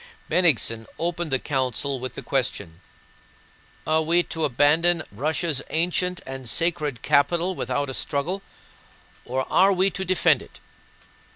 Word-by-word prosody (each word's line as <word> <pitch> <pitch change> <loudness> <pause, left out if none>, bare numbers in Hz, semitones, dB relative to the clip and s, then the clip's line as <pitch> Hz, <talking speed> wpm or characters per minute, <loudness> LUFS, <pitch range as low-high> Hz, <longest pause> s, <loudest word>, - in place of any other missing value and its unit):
Bennigsen 115 -10 +2
opened 170 0 -2
the 135 - +2
council 130 0 -1
with 130 +1 -6
the - - -7
question: 100 - -2 1.0
"Are 155 0 +2
we 170 +2 +2
to 160 -2 -3
abandon 155 +6 +3
Russia's 150 - -1
ancient 180 +2 0
and 130 -2 -5
sacred 155 -4 0
capital 170 +6 +2
without 140 -2 -2
a 135 - -4
struggle, 160 +10 -2 0.8
or 130 +1 -2
are 195 +2 +5
we 190 +1 +2
to 190 - -4
defend 185 0 +3
it?" - - -15
155 Hz, 130 wpm, -24 LUFS, 130-175 Hz, 1.0 s, are